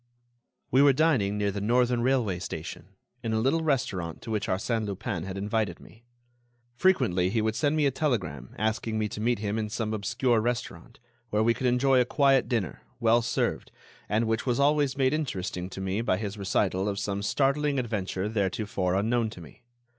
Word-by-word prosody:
We 130 - +5
were 140 -1 +6
dining 130 -9 +2
near 100 -1 0
the 100 0 -4
Northern 120 +2 +2
Railway 120 -8 +1
station, 90 +2 -7 0.3
in 115 -1 -2
a 110 - +2
little 135 +8 +2
restaurant 95 - -1
to 115 - -6
which 105 -2 -1
Arsène 110 +3 -1
Lupin 100 -3 -4
had 95 0 -5
invited 105 -2 -1
me. 115 +2 -17 0.7
Frequently 120 - +2
he 115 - 0
would 110 0 0
send 150 +3 +1
me 155 -2 +2
a 140 - +3
telegram 95 - -2
asking 110 +1 -1
me 110 -1 0
to 105 - -6
meet 120 +1 +2
him 105 +1 -2
in 105 -1 -2
some 110 0 -2
obscure 120 +3 +1
restaurant, 120 0 -4 0.3
where 105 0 +1
we 115 +1 +4
could 125 +3 -1
enjoy 125 +1 +4
a - - +2
quiet 135 0 +3
dinner, 110 - -2 0.2
well 115 +1 +4
served, 115 - -1 0.4
and 110 +3 +2
which 110 0 0
was 120 0 +1
always 145 -1 +2
made 130 0 +2
interesting 95 - -3
to 95 - -8
me 95 +3 -1
by 95 -5 +1
his 105 0 -4
recital 95 -1 0
of 100 - -3
some 100 0 -2
startling 140 +6 +1
adventure 105 -5 -2
theretofore 100 -3 -1
unknown 115 +3 +1
to 100 - -11
me. 80 +7 -14
110 Hz, 190 wpm, -27 LUFS, 100-125 Hz, 0.7 s, were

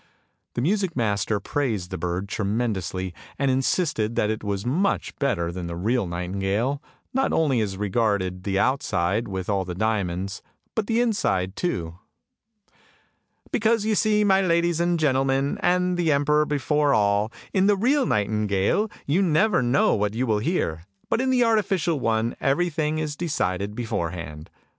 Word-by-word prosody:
The - - -1
music 190 +1 0
master 105 -2 0
praised 105 -6 -2
the 95 - -3
bird 90 +3 -2
tremendously, 100 -4 -2 0.2
and 140 -1 +1
insisted 130 - 0
that 105 - +1
it 110 - -4
was 100 0 -3
much 175 +11 0
better 85 -12 0
than 90 0 -5
the 85 - -5
real 110 +4 0
nightingale, 95 +10 -1 0.3
not 265 +1 +1
only 140 -7 +2
as 100 -3 -2
regarded 100 -3 0
the 95 -1 -1
outside 115 - +1
with 95 -2 -4
all 100 -2 +1
the 90 -1 -6
diamonds, 100 -2 -1 0.3
but 220 -2 -1
the 230 0 +1
inside 95 - 0
too. 85 - -3 0.8
" - - -33
Because 225 -1 +2
you 220 - +2
see, 210 0 +3
my 195 -1 +4
ladies 170 -2 +2
and 170 0 +1
gentlemen, 135 -1 +1
and 180 0 +2
the 170 -3 +2
emperor 150 +1 +2
before 145 0 +1
all, 105 +1 +2 0.2
in 195 0 +3
the 205 -1 +4
real 260 +6 +2
nightingale 105 - +1 0.2
you 160 +7 +2
never 185 +2 +3
know 125 +3 +3
what 105 0 0
you 125 +3 0
will 110 -3 +1
hear, 105 - -1 0.3
but 230 - +2
in 260 - 0
the 255 -1 +4
artificial 195 -9 +1
one 115 -1 0
everything 155 +1 +1
is 155 -2 -2
decided 105 - -2
beforehand! 85 -9 -4
120 Hz, 155 wpm, -24 LUFS, -, 0.8 s, my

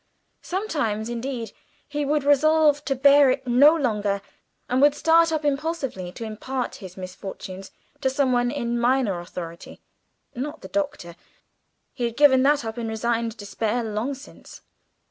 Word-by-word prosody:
Sometimes, 235 - -2
indeed, 240 -1 -4 0.4
he 295 0 -2
would 295 0 +1
resolve 295 +1 +4
to 270 - 0
bear 280 +1 +6
it 260 +1 -1
no 270 +6 +6
longer, 210 -9 0 0.5
and 255 +2 +1
would 290 0 +5
start 330 +1 +4
up 310 -1 -1
impulsively 275 - -2
to - - -7
impart 245 +4 -4
his 185 -2 -11
misfortunes 190 +1 -8 0.3
to 265 - +1
some 265 0 +1
one 245 0 +2
in 240 -3 -2
minor 240 -6 +1
authority 170 -1 -8 0.5
not 295 +5 -5
the - - -8
Doctor, 290 - -3 0.8
he 245 -3 -2
had 235 -1 -4
given 270 -3 +6
that 285 -2 +3
up 225 +2 -5
in 230 - -3
resigned 230 0 -1
despair 215 +4 -2
long 225 +5 -3
since. 275 +2 -14
255 Hz, 150 wpm, -24 LUFS, 220-290 Hz, 0.8 s, bear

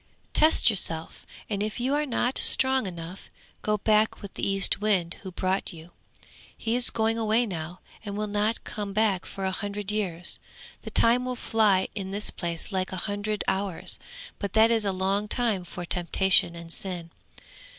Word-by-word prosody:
'Test 315 +1 +5
yourself, 165 -7 +1 0.2
and 205 -2 -2
if 215 +3 -3
you 255 +3 0
are 295 +1 0
not 245 0 0
strong 260 -4 +5
enough, 175 +1 -8 0.3
go 210 0 0
back 215 +1 +2
with 200 -2 -9
the - - -7
Eastwind 195 -2 +2
who 190 - -7
brought 185 +3 -1
you. 165 +1 -12 0.7
He 230 +1 -1
is 245 0 +5
going 225 0 0
away 225 +2 +3
now, 175 -3 -6 0.2
and 205 -2 -5
will 215 - -1
not 210 +2 -1
come 205 -2 -5
back 205 -3 +1
for 195 -1 -5
a 190 - 0
hundred 205 +1 -4
years; 180 -5 -3 0.4
the - - -7
time 240 +2 +3
will 255 0 -3
fly 215 -5 +2
in 195 -3 -5
this 205 +2 0
place 170 +2 -5
like 190 -1 -1
a - - -3
hundred 205 0 -2
hours, 190 -2 -1 0.4
but 200 -2 -4
that 225 +1 +5
is 225 -2 +2
a 200 - +1
long 195 +2 -1
time 220 -5 0
for 175 0 -7
temptation 175 0 +2
and 170 0 -6
sin. 175 -3 -4
200 Hz, 175 wpm, -26 LUFS, 185-220 Hz, 0.7 s, Test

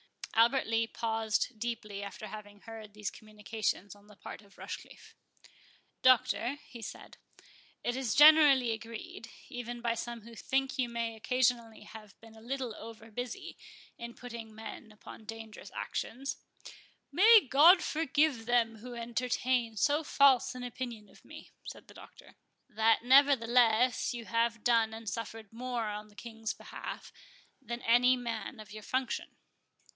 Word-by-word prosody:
Albert 235 +4 +4
Lee 225 0 +1
paused 225 0 -1
deeply 215 -3 -4
after 200 +1 -7
having 205 -1 -10
heard 220 -2 -10
these 210 -2 -4
communications 210 -2 -4
on 205 0 -20
the 210 - -16
part 200 - -9
of 200 -2 -21
Rochecliffe. - - -9 0.9
"Doctor," 255 0 +3
he 235 - -11
said, 215 - -9 0.7
"it 240 - -1
is 255 -6 -1
generally 295 -5 +7
agreed, 225 +1 -7 0.2
even 240 0 -6
by 235 -1 0
some 235 0 -5
who 230 +2 -13
think 265 +4 -1
you 245 -2 +1
may 230 -1 -3
occasionally 240 -1 0
have 210 -2 -13
been 225 -1 -15
a 220 - -14
little 255 0 -4
over 225 0 -11
busy 245 +2 -6 0.4
in 235 0 -7
putting 230 -3 -9
men 220 0 -9
upon 215 +1 -13
dangerous 225 0 -9
actions"— 270 +4 -4 0.7
"May 430 - +7
God 330 +8 +7
forgive 300 -6 +1
them 235 -2 +2
who 245 +3 -9
entertain 240 0 -1
so 295 +7 +2
false 275 -4 +4
an 250 - -6
opinion 240 -3 -6
of - - -20
me," - - -12 0.2
said - - -9
the - - -15
Doctor. - - -15 0.3
—"That, 220 +1 +2
nevertheless, 250 -3 +4
you 235 -1 -7
have 230 0 0
done 230 -2 +3
and 225 0 -10
suffered 225 +1 -6
more 240 -1 -3
in 210 +1 -6
the 205 - -21
King's 225 -1 -5
behalf - - -8 0.5
than 240 -2 -6
any 250 +2 +5
man 235 0 -5
of 215 -2 -11
your 215 - -8
function." 260 +5 -3
230 Hz, 150 wpm, -31 LUFS, 220-250 Hz, 0.9 s, generally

